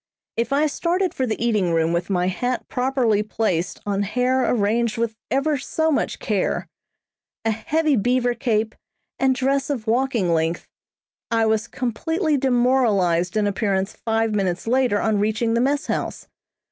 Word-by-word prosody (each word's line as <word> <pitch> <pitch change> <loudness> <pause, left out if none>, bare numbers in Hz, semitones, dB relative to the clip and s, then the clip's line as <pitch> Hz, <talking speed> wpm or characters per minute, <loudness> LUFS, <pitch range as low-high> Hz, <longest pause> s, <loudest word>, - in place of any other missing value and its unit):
If 230 +3 -1
I 285 +2 +3
started 350 +5 0
for 260 - -1
the 220 - -2
eating 210 -7 +1
room 165 0 +2
with 170 +2 -1
my 180 -2 +1
hat 245 +7 -2
properly 250 -5 +1
placed 200 -5 -1
on 200 -1 0
hair 250 +5 +1
arranged 230 +1 +1
with 230 -1 -1
ever 280 +1 +1
so 315 +4 0
much 285 - 0
care, - - -1 0.8
a 225 - +3
heavy 300 +7 +1
beaver 245 +2 +1
cape, 225 -3 0 0.5
and 265 -1 +3
dress 270 +2 0
of 250 -7 -2
walking 235 -6 +1
length, 165 +1 -1 0.6
I 225 -1 +2
was 220 0 +1
completely 310 - -1
demoralized 240 -9 +2
in 210 - +2
appearance 195 -1 0
five 225 -1 -1
minutes 190 -4 -1
later 245 -3 +2
on 220 -2 +1
reaching 220 +2 0
the 235 - +2
mess 285 +3 +1
house. - - -3
230 Hz, 155 wpm, -22 LUFS, 205-260 Hz, 0.8 s, I